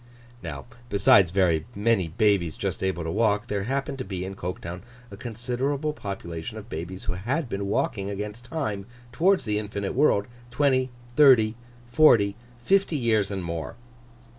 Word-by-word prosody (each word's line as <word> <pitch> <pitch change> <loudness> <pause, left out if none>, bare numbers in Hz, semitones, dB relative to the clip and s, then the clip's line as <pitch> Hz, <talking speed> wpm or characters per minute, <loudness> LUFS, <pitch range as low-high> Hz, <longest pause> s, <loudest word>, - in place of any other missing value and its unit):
Now, 75 -5 -6 0.2
besides 100 -3 +5
very 90 -3 +2
many 105 -3 +2
babies 90 -2 +1
just - - -3
able 95 -3 -1
to 80 - -3
walk, 105 +1 +2
there 100 -4 -2
happened 135 +2 -2
to - - -2
be 95 -2 -4
in 95 - -5
Coketown 90 -1 -6 0.3
a - - -7
considerable 125 +7 -2
population 95 - -6
of 110 +1 -10
babies 90 +2 -6
who - - -2
had 125 - -2
been 100 -2 -3
walking 100 0 -1
against 105 +4 -5
time 110 -8 -3 0.2
towards 185 +10 +2
the 105 -1 0
infinite 100 -2 -4
world, 125 -7 +3 0.2
twenty, 130 0 +2 0.3
thirty, 125 -7 +6 0.3
forty, 115 -6 +5 0.3
fifty 195 -1 +2
years 110 -6 +2
and 95 -2 -4
more. 85 +3 -4
105 Hz, 155 wpm, -26 LUFS, 95-125 Hz, 0.3 s, thirty